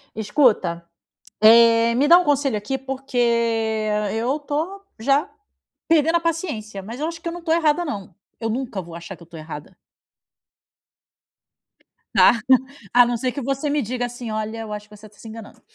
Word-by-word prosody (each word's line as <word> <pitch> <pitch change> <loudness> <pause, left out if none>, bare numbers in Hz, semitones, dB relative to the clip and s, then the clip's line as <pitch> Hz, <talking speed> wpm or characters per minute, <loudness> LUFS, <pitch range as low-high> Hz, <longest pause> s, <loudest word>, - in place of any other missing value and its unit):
Escuta, 210 - +1 0.5
eh, 230 +1 +6
me 275 +4 +2
dá 345 - +9
um 360 - 0
conselho 285 -5 +1
aqui, 210 +6 -3
porque 270 -1 -5 1.0
eu 245 +6 -1
tô 315 +7 -4 0.2
já 275 +6 +1 0.6
perdendo 325 0 +3
a - - +2
paciência. 300 - -3
Mas 225 +5 -8
eu 305 - -2
acho 330 0 -6
que 335 - -5
eu - - -4
não 350 0 -8
tô 325 -1 0
errada 330 +1 +2
não. 200 - -6 0.3
Eu 225 - -2
nunca 235 -3 -3
vou 170 -2 -10
achar 170 +3 -8
que 175 - -16
eu - - -15
tô 170 0 -13
errada. 155 +3 -9 2.4
Tá, 235 - +6 0.5
a 245 0 +7
não 240 0 -1
ser 250 +1 -2
que 285 - -4
você 275 +3 -2
me 295 0 +1
diga 245 +1 -3
assim: 245 -1 -7
"Olha, 215 +1 -4
eu 220 -1 -7
acho 210 0 -6
que 210 - -15
você 210 +1 -14
tá 205 - -25
se - - -12
enganando." 220 -1 -11
245 Hz, 185 wpm, -22 LUFS, 215-290 Hz, 2.4 s, dá